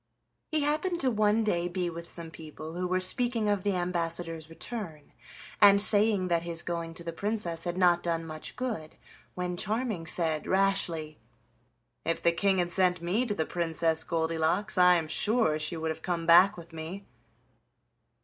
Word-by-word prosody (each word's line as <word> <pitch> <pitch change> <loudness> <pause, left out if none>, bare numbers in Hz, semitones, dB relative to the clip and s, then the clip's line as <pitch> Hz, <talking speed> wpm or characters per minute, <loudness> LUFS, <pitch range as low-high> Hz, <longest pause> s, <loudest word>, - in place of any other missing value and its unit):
He 310 -1 +1
happened 310 +5 0
to 260 -2 +1
one 215 0 +2
day 175 -5 0
be 175 0 -2
with 170 0 -7
some 165 -1 -8
people 155 0 -9
who 180 +1 -2
were 185 +1 +1
speaking 230 +4 +1
of 205 -2 +1
the 200 0 0
ambassador's 165 -2 -2
return 165 -4 -7 0.5
and 200 -1 +8
saying 205 -2 +3
that 170 -2 +1
his 170 -1 -4
going 170 -1 -4
to 170 - -8
the 170 0 -5
Princess 180 -4 -1
had 175 0 -2
not 175 -2 +4
done 165 -1 -2
much 155 -1 -6
good, 220 -12 -4 0.4
when 180 -1 -3
Charming 210 -3 -2
said 160 -2 0
rashly: 180 -5 +1 0.8
"If 165 - -1
the 170 - +5
King 195 +3 +1
had 175 -1 0
sent 180 -1 +2
me 190 +9 0
to 205 - -2
the 160 - -1
Princess 165 -1 -1
Goldilocks 165 +5 0
I 180 -1 +6
am 165 -2 -1
sure 205 -4 +1
she 155 +2 -2
would 160 0 -2
have 160 - -7
come 170 -2 -2
back 180 +4 +6
with 170 -1 -12
me." 165 +5 -7
175 Hz, 175 wpm, -29 LUFS, 165-200 Hz, 0.8 s, and